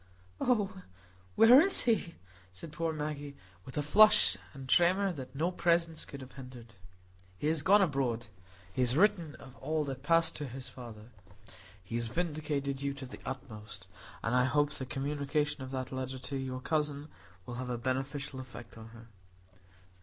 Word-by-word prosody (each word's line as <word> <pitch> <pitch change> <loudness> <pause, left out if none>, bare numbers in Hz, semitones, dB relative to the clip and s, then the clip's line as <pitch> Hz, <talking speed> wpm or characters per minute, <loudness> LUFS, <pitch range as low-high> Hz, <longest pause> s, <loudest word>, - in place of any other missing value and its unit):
"Oh, 210 -6 +1 0.5
where 245 +5 +9
is 380 +3 +3
he?" 220 -8 +1 0.4
said 150 - -9
poor 165 +1 -1
Maggie, 150 -2 -4 0.3
with 130 - -9
a 150 - +1
flush 175 - +6 0.2
and 135 +3 -9
tremor 180 +8 +4
that 135 -3 -8
no 165 +6 +1
presence 170 -2 +1
could 140 - -9
have 130 0 -10
hindered. 125 -3 -11 0.6
"He - - -5
is 160 -1 +1
gone 200 +6 +6
abroad; 130 -8 0 0.5
he - - 0
has 125 +2 +3
written 170 -6 +3
of 130 -1 -13
all 155 0 -1
that 135 -2 -5
passed 165 +3 +3
to 145 - -4
his 130 0 -7
father. 120 -3 -10 0.7
He 95 - -10
has 120 -1 0
vindicated 145 -2 -2
you 140 0 -1
to 135 -1 -7
the 125 - -10
utmost; 110 -7 -7 0.4
and 115 - 0
I 125 0 +4
hope 145 +2 +2
the 130 -3 -5
communication 145 +2 -1
of 130 - -6
that 130 -1 -4
letter 130 0 -4
to 135 +2 -5
your 130 -1 -3
cousin 150 0 -1 0.4
will 120 - -6
have 125 - -5
a 120 - -1
beneficial 135 +3 -3
effect 120 -3 -10
on 110 - -10
her." 115 0 -14
140 Hz, 170 wpm, -32 LUFS, 130-160 Hz, 0.7 s, where